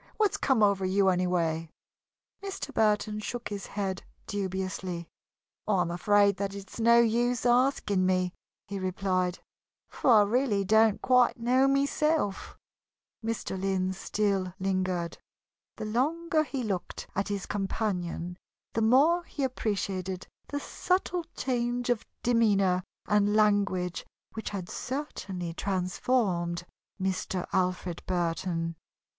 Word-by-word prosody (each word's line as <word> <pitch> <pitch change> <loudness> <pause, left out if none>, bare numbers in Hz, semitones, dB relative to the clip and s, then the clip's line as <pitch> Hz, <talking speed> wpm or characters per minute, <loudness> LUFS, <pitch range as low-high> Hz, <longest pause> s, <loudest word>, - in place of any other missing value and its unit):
What's 425 -3 +2
come 260 -6 +2
over 200 -2 +3
you, 190 +1 +3
anyway?" 170 -3 0 0.7
Mr. 390 -7 -5
Burton 210 -1 +2
shook 240 +3 -4
his 205 -1 -5
head 195 -2 -3 0.2
dubiously. 185 -3 -3 0.6
"I 205 -3 +3
am 170 -1 -1
afraid 200 +3 +3
that 200 0 -3
it 200 -1 -9
is - - -8
no 235 +1 +6
use 235 +1 +2
asking 240 -6 +3
me," 185 -1 +1 0.3
he 200 0 -4
replied, 185 -1 0 0.5
"for - - -1
I 220 -3 +8
really 210 -2 +1
don't 220 +1 +4
quite 250 -2 +4
know 255 +3 +3
myself." 280 -4 +1 0.7
Mr. 220 -4 -3
Lynn 190 -1 0
still 195 -2 -1
lingered. 185 -3 -1 0.6
The - - -4
longer 310 +8 +1
he 270 -4 -3
looked 190 -5 -3
at 195 - -1
his 200 -1 -3
companion, 180 -3 -2 0.3
the 225 - 0
more 285 +10 +5
he 285 - -4
appreciated 195 -7 -2 0.2
the 285 - -3
subtle 360 +1 -1
change 245 -1 0
of 240 - -1 0.2
demeanor 200 -6 +3 0.2
and 210 0 +3
language 200 -4 +2 0.3
which 220 - -4
had 190 -4 -5
certainly 190 - -4
transformed 180 -1 0 0.3
Mr. 185 -1 -1
Alfred 180 -2 0
Burton. 165 -1 -1
200 Hz, 120 wpm, -29 LUFS, 185-235 Hz, 0.7 s, I